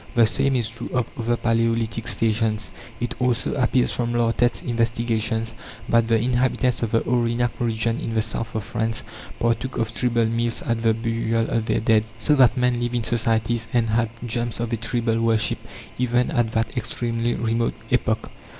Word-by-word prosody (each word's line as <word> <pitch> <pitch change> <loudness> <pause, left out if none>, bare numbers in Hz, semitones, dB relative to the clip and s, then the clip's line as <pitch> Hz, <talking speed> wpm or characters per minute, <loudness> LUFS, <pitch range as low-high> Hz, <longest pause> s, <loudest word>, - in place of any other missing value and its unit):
The 120 -1 +6
same 135 +4 +1
is 120 -3 +1
true 115 0 -7
of 125 -2 +2
other 120 0 0
palaeolithic 115 -1 0
stations. 110 -1 0 0.3
It 120 -1 -2
also 125 -1 +1
appears 125 -1 +2
from 120 -1 -1
Lartet's 120 +1 +1
investigations 115 -1 0 0.3
that 115 -1 +3
the 115 0 +3
inhabitants 125 +1 +1
of 115 - 0
the 115 +1 +2
Aurignac 120 0 +1
region 115 0 0
in 115 - -4
the 110 - +3
south 115 0 -4
of 110 - -1
France 110 +1 -2 0.4
partook 120 +3 0
of 115 -1 -1
tribal 120 -2 +1
meals 115 +1 -1
at 115 -1 -1
the 115 -1 +3
burial 115 0 0
of 115 -1 0
their - - +1
dead. 110 0 +3
So 130 +7 +2
that 130 0 +5
men 125 -1 +2
lived 120 0 -1
in 120 - 0
societies, 115 0 0
and 115 -2 +2
had 115 0 +2 0.2
germs 120 0 -2
of 120 0 -2
a - - +1
tribal 115 0 0
worship, 115 -1 +1 0.4
even 125 +2 +1
at 120 -6 +1
that 110 +2 -1
extremely 120 0 -1
remote 115 0 0 0.2
epoch. 110 -3 0
115 Hz, 175 wpm, -23 LUFS, 115-120 Hz, 0.4 s, The